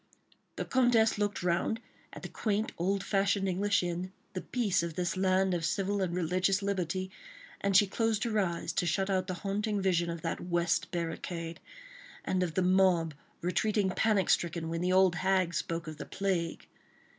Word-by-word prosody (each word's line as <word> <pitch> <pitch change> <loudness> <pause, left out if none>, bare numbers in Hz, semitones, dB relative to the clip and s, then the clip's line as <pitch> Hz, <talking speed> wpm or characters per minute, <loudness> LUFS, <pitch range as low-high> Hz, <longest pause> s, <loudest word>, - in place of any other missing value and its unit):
The - - -3
Comtesse 235 -4 +3
looked 205 -3 -1
round 180 +6 0 0.3
at - - -10
the - - -4
quaint, 215 0 -1
old 190 +3 0
fashioned 195 -1 +1
English 195 +1 +1
inn, 175 +1 -3 0.2
the 185 - -3
peace 225 -9 0
of 170 -2 -4
this 175 0 -1
land 190 0 +2
of 170 -2 -1
civil 195 +4 0
and 175 -2 -1
religious 185 +3 +1
liberty, 185 -1 -2 0.5
and 200 -1 +4
she 205 - +6
closed 220 +2 0
her 220 -3 0
eyes 170 -4 -1
to 175 - 0
shut 195 +3 0
out 185 -1 0
the 185 - -3
haunting 205 +1 0
vision 175 -3 +1
of 170 -1 -5
that 165 - -2
West 175 -1 0
Barricade, 170 -1 -4 0.7
and 185 -1 0
of 170 -3 -1
the 185 - +2
mob 180 -3 +3 0.3
retreating 195 +2 +1
panic 205 -2 +2
stricken 170 -1 0
when 165 0 -2
the 180 +1 +1
old 185 -2 +4
hag 185 -2 +1
spoke 165 0 -2
of 155 -1 -7
the - - -7
plague. 185 -4 -2
185 Hz, 180 wpm, -31 LUFS, 170-200 Hz, 0.7 s, she